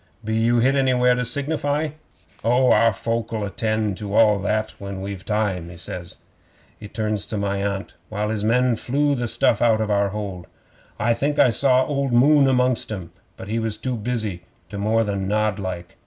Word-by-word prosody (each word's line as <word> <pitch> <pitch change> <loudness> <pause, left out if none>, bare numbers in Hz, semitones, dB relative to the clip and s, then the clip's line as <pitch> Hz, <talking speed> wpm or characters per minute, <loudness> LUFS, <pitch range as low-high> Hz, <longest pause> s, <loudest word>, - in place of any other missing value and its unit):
Be 110 - -2
you 115 +2 +2
hit 130 +3 +3
anywhere 130 -2 +3
to 125 0 -1
signify?" 145 +3 -1 0.5
'"Oh, 125 +3 +3
our 115 0 +5
folk'll 115 +1 -3
attend 110 -1 -1
to 105 -1 -5
all 105 -3 +5
that 110 +2 -1
when 100 -1 -6
we've 95 -1 -6
time," 100 -5 -1
he 85 - -11
says. 90 +1 -3 0.6
He 105 - -8
turns 105 -1 -2
to - - -4
talk 100 - -2
to - - 0
my 100 0 -2
Aunt, 100 -1 -3 0.2
while 105 0 -2
his 105 -2 -2
men 125 +2 +2
flew 145 +5 0
the 120 -3 -2
stuff 110 - +1
out 115 -2 +4
of 110 -1 -1
our 100 -1 +2
hold. 95 -3 -6 0.5
I 120 +1 +2
think 145 +5 -1
I 125 - +6
saw 130 +2 +3
old 140 -3 -1
Moon 140 +3 +5
amongst 125 -3 +1
'em, 95 -5 -6 0.3
but - - -9
he 110 +2 -1
was 110 -1 -2
too 130 -1 -3
busy 110 -5 -3 0.3
to 100 0 -6
more 110 +2 +2
than 100 -2 -2
nod 105 -1 0
like. 90 -3 -6
110 Hz, 200 wpm, -22 LUFS, 100-125 Hz, 0.6 s, I